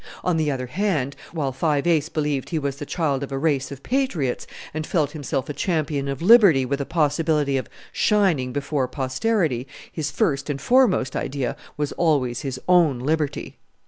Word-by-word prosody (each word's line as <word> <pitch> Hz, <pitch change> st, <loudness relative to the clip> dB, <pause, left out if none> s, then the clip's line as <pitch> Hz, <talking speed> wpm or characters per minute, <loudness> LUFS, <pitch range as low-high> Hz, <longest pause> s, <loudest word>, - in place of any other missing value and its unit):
On 180 Hz, -, +1 dB
the 155 Hz, -2 st, +1 dB
other 130 Hz, -3 st, -2 dB
hand, 150 Hz, -3 st, -1 dB, 0.2 s
while 150 Hz, -5 st, -2 dB
Five 145 Hz, +2 st, 0 dB
Ace 160 Hz, -3 st, +2 dB
believed 150 Hz, -4 st, -2 dB
he 165 Hz, -, -1 dB
was 140 Hz, -2 st, -2 dB
the 145 Hz, -, -7 dB
child 145 Hz, -6 st, -1 dB
of 140 Hz, -, -5 dB
a 135 Hz, -, -2 dB
race 140 Hz, -2 st, 0 dB
of 140 Hz, -1 st, -9 dB
patriots 225 Hz, -, -1 dB, 0.3 s
and 155 Hz, 0 st, -4 dB
felt 150 Hz, -5 st, +1 dB
himself 140 Hz, -3 st, -3 dB
a 145 Hz, -, -4 dB
champion 150 Hz, -3 st, -1 dB
of 140 Hz, +3 st, -4 dB
liberty 190 Hz, -, +7 dB
with 140 Hz, +2 st, -2 dB
a 140 Hz, -, -4 dB
possibility 150 Hz, -2 st, +1 dB
of 130 Hz, -, -2 dB, 0.2 s
shining 185 Hz, -, +2 dB
before 140 Hz, 0 st, -1 dB
posterity, 130 Hz, -, -1 dB, 0.2 s
his 155 Hz, -2 st, -3 dB
first 145 Hz, -1 st, 0 dB
and 140 Hz, -1 st, -2 dB
foremost 235 Hz, -, +3 dB
idea 135 Hz, -2 st, -2 dB, 0.2 s
was 150 Hz, -1 st, -1 dB
always 135 Hz, -8 st, +1 dB
his 135 Hz, -3 st, -4 dB
own 170 Hz, -7 st, +4 dB
liberty! 150 Hz, +3 st, -2 dB
145 Hz, 175 wpm, -23 LUFS, 135-165 Hz, 0.3 s, liberty